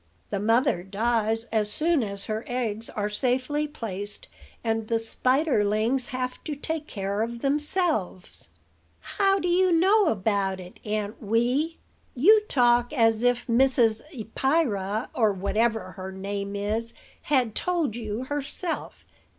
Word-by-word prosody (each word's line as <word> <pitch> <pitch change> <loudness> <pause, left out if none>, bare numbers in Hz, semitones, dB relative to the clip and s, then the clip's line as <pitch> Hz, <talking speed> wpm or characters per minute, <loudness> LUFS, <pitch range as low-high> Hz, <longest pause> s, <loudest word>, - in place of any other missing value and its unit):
The 200 - -1
mother 225 0 +2
dies 220 +3 0
as 210 -2 +1
soon 315 +5 +2
as 200 -3 -4
her 220 +1 -3
eggs 230 -3 -3
are 205 -1 -2
safely 255 +7 0
placed, 205 -8 -6 0.4
and 225 -1 -1
the 230 - +1
spiderlings 240 -1 +1
have 255 -2 -4
to 300 - -3
take 310 +1 -4
care 200 0 -3
of 235 +1 -3
themselves." 295 - -1 0.5
"How 390 -1 +1
do 355 - -2
you 365 +1 +3
know 385 +4 +4
about 200 -4 0
it, 180 0 -11
Aunt 210 0 -3
Wee? 245 +9 +1 0.4
You 415 - +6
talk 240 -2 +3
as 225 -4 +3
if 245 0 +2
Mrs. 240 -2 +3
Eppyra 225 - -1
or 220 -3 +3
whatever 215 +1 0
her 185 +2 -7
name 200 +1 -4
is 215 +3 -2 0.3
had 255 -7 +1
told 335 - -1
you 225 0 -4
herself. 290 +5 -4
230 Hz, 135 wpm, -26 LUFS, 210-280 Hz, 0.5 s, You